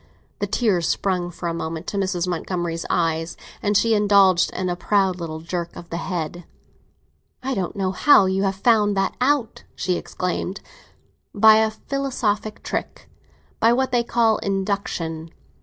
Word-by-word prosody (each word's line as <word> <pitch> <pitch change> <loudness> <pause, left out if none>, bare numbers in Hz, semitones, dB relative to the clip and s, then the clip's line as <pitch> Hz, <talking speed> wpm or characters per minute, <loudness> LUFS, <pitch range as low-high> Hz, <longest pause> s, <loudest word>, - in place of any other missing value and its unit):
The 205 - -1
tears 200 -6 +1
sprang 180 -3 0
for 175 0 -6
a 170 - -1
moment 165 0 -4
to 200 - -3
Mrs. 185 -2 -1
Montgomery's 175 -1 -3
eyes, 165 0 0 0.2
and 205 -1 +2
she 230 +1 +3
indulged 200 -4 +4
in 185 - -3
a 175 - -1
proud 190 0 +1
little 160 -2 -5
jerk 170 0 -4
of 170 - -11
the 170 - -2
head. 175 0 -4 1.0
"I 265 +1 -1
don't 190 -4 -3
know 190 -2 -1
how 200 +2 +5
you 190 +1 0
have 195 -1 0
found 210 -1 +3
that 195 - +1
out!" 255 -3 +1
she 180 -1 -1
exclaimed. 180 +1 -3 0.8
"By 215 +1 +7
a 220 0 +3
philosophic 220 -3 -3
trick—by 230 +1 -3
what 260 +1 0
they 240 -1 +2
call 230 -2 +2
induction. 190 -5 -3
195 Hz, 155 wpm, -22 LUFS, 175-215 Hz, 1.0 s, By